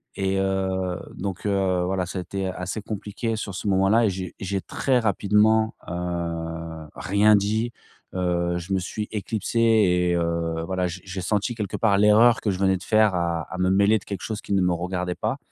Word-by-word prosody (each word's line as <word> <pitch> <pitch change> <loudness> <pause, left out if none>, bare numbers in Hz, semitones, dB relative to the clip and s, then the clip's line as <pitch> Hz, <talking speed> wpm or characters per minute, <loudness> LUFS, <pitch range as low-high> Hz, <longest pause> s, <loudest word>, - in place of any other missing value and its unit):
Et 95 0 0
heu, 95 -1 -1 0.2
donc 95 -1 -5
heu, 95 -3 +1
voilà, 95 0 -1
ça 95 - -5
a - - -2
été 95 +2 -4
assez 90 +3 -4
compliqué 110 +2 -3
sur 100 -3 -5
ce 105 - -4
moment 95 0 +3
là 115 +2 +4
et - - +3
j'ai 90 -1 -6
j'ai 95 0 -2
très 130 -2 0
rapidement, 110 +1 +3
heu, 85 -2 -4
rien 105 +2 +4
dit, 110 +4 0 0.4
heu, 85 -1 0
je 90 +3 -4
me 95 - +2
suis 105 +4 -4
éclipsé 110 +2 -3
et 95 -6 +4
heu, 85 -1 -1
voilà, 95 -1 -1
j'ai 90 +1 -5
j'ai 95 0 -5
senti 105 +5 -1
quelque 105 -3 -3
part 105 -3 +3
l'erreur 105 +3 +5
que 105 - 0
je 95 - -4
venais 95 -1 +3
de 90 - -12
faire 110 -3 +3
à 85 -1 0
à 95 - -6
me 90 0 +2
mêler 100 +3 +4
de 100 - -9
quelque 100 -3 -5
chose 110 -2 -4
qui - - -4
ne 95 - +3
me 90 - +2
regardait 90 +1 -2
pas. - - -2
95 Hz, 205 wpm, -24 LUFS, 90-105 Hz, 0.4 s, l'erreur